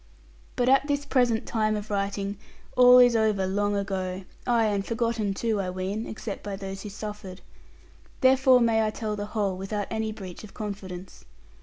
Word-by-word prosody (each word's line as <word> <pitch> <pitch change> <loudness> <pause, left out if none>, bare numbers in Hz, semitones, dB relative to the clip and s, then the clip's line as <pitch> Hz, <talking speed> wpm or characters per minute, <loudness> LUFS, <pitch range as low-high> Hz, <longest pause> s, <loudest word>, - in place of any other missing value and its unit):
But 245 - +1
at 270 +2 +4
this 285 -1 -1
present 245 -4 +2
time 215 -2 0
of 210 0 -5
writing, 200 0 -2 0.4
all 250 0 +8
is 245 -1 +7
over 215 -3 +2
long 205 +2 0
ago; 190 -2 -3 0.2
ay 235 -2 +3
and 205 -2 0
forgotten 230 -3 -1
too, 220 -1 0
I 185 - -3
ween, 190 +4 -3
except 215 -1 -6
by 205 -1 -5
those 195 0 -6
who 210 - -7
suffered. 205 -2 -7 0.8
Therefore 260 -1 +5
may 225 -1 +3
I 215 - +1
tell 215 0 -3
the 205 0 -4
whole 200 -3 +1
without 195 +2 -3
any 220 0 -1
breach 190 -4 -9
of 210 - -12
confidence. 195 -3 -7
210 Hz, 175 wpm, -26 LUFS, 195-230 Hz, 0.8 s, all